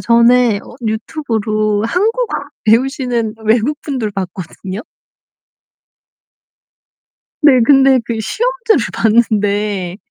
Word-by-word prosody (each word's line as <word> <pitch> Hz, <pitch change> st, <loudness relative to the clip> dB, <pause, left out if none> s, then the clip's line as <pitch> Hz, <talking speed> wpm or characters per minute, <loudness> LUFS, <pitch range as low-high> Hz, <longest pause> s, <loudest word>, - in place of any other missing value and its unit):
전에 235 Hz, -1 st, +4 dB
어 -, -, -13 dB
유튜브로 215 Hz, -3 st, -1 dB
한국어 445 Hz, -, 0 dB, 0.4 s
배우시는 235 Hz, -1 st, +1 dB
외국분들 240 Hz, +1 st, 0 dB
봤거든요. 185 Hz, 0 st, -6 dB, 2.6 s
네. 275 Hz, -4 st, +6 dB
근데 270 Hz, 0 st, +5 dB
그 230 Hz, -2 st, -4 dB
시험지를 480 Hz, -, 0 dB
봤는데 205 Hz, -4 st, 0 dB
230 Hz, 195 characters per minute, -15 LUFS, 215-270 Hz, 2.6 s, 네